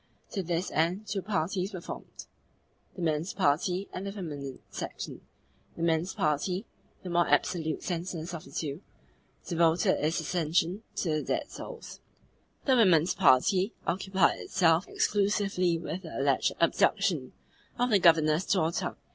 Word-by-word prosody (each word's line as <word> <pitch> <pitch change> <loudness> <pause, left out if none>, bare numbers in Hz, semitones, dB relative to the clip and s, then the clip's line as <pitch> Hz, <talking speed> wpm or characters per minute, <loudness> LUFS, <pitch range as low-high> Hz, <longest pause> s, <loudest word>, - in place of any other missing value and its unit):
To 195 - -2
this 175 +1 -2
end 175 +7 0
two 200 -1 -2
parties 190 +1 -2
were - - -4
formed 170 - -9 0.7
the 180 - -5
men's 160 +2 -1
party 180 +2 +1
and 185 - -5
the 200 - -4
feminine 145 -9 -6
section. - - -6 0.6
The 165 - -3
men's 165 +2 +1
party 180 +3 0 0.4
the 180 - -5
more 175 0 +3
absolutely 160 -3 +1
senseless 175 -1 -4
of 165 - -6
the - - -14
two 150 +1 -4 0.6
devoted 170 -2 +2
its 160 +3 +1
attention 170 +4 0
to 170 - -1
the - - -1
dead - - -2
souls: - - -9 0.7
the 265 - +4
women's 180 -7 +4
party 185 - +4
occupied 190 +1 +1
itself 170 -1 +2
exclusively 195 -4 +1
with 165 +2 -5
the - - -8
alleged - - +2
abduction - - +2 0.4
of 245 0 +1
the 205 - +5
Governor's 160 -1 +4
daughter. 170 -2 0
175 Hz, 140 wpm, -29 LUFS, 160-195 Hz, 0.7 s, the